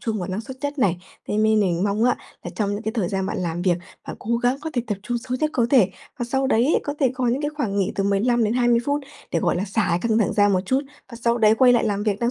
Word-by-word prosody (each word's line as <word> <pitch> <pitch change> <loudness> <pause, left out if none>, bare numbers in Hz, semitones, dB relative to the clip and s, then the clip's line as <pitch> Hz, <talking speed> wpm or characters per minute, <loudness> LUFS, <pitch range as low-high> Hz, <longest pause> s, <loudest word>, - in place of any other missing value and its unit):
trung 220 -2 -2
vào 180 - -4
năng 190 +3 -3
suất 260 +3 -9
nhất 285 0 -3
này. 190 -8 +2 0.3
Thế - - -1
nên 215 0 +3
mình 175 -3 +1
mong 205 +2 +1
á, 250 - +3 0.3
là - - -6
trong 205 -2 0
những 205 - -4
cái 220 - -2
thời 215 -7 -1
gian 190 0 -2
bạn 195 - -3
làm 175 -1 -2
việc, 180 -2 +2 0.3
bạn - - -6
cố 235 +2 -1
gắng 245 +2 +1
có 320 - -5
thể 245 - -1
tập 205 -3 -3
trung 240 +3 -2
sâu 255 +1 -4
nhất 305 - +1
có 235 -2 +2
thể. 230 -9 +5 0.3
Và 240 - -1
sau 265 +2 0
đấy, 265 +3 +3
có 290 - -4
thể 265 -4 +3
có 255 -1 -1
những 255 +5 0
cái 295 - -1
khoảng 220 -9 -2
nghỉ 195 -2 0
từ 195 - -1
15-20 235 +3 +2
phút 285 +2 0 0.3
để, 170 - +1
gọi - - +1
là, 185 - -1
xả 210 +2 0
cái 170 0 +2
căng 220 0 +3
thẳng 215 - +1
ra 205 -1 +4
một 185 -2 +2
chút, 260 +5 +2 0.3
và 235 - -8
sau 235 +1 +1
đấy 215 -1 +5
quay 250 +1 +5
lại 240 - +3
làm 205 -2 -1
việc 210 -2 0
năng 235 0 +1
225 Hz, 300 wpm, -23 LUFS, 200-245 Hz, 0.3 s, thể